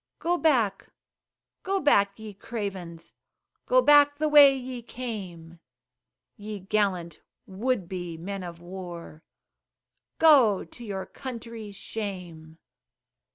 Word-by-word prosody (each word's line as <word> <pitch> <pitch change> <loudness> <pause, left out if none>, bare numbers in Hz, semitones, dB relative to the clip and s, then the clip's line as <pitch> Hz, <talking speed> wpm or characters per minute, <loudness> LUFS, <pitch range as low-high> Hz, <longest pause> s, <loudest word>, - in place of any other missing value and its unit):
Go 345 +1 0
back, 245 - +1 0.7
go 390 +1 -1
back 200 - +3
ye 220 -1 -9
cravens, 190 -6 -7 0.5
Go - - +4
back 290 0 +6
the 305 +1 0
way 285 -2 +7
ye 255 -1 -6
came; 190 -9 -8 0.8
Ye 210 0 -7
gallant, 185 -5 -1 0.3
would 205 0 -2
be, 175 -2 -6
men 195 +4 -6
of 170 -2 -8
war, 175 -3 -9 1.0
Go! 265 -11 +5
to 200 +8 -13
your 195 -4 -5
country's 230 -5 -8
shame. 180 -8 -7
205 Hz, 110 wpm, -26 LUFS, 180-255 Hz, 1.0 s, way